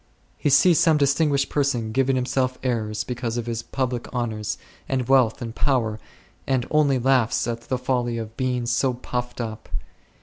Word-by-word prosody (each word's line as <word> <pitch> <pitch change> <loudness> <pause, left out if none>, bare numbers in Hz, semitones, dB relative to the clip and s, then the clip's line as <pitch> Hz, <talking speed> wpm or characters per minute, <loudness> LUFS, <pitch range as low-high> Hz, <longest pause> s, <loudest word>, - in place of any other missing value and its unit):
He - - 0
sees 160 +5 +6
some 160 -3 +4
distinguished 140 0 +2
person 125 -6 0
giving 135 +2 +2
himself 130 0 0
airs 110 -4 -1
because 120 -1 -3
of 120 - -2
his 115 -1 -3
public 125 -1 -3
honours, 110 -4 -2 0.3
and 130 -3 0
wealth, 130 -2 +3
and 115 -1 -5
power, 115 -6 0 0.5
and 130 -3 +1
only 150 -3 +3
laughs 125 -2 +2
at 115 0 -3
the 130 +2 -2
folly 125 -2 -1
of 110 -1 -6
being 125 -2 -1
so 120 +2 +1
puffed 125 0 -4
up. 110 -2 -5
125 Hz, 165 wpm, -24 LUFS, 115-135 Hz, 0.5 s, sees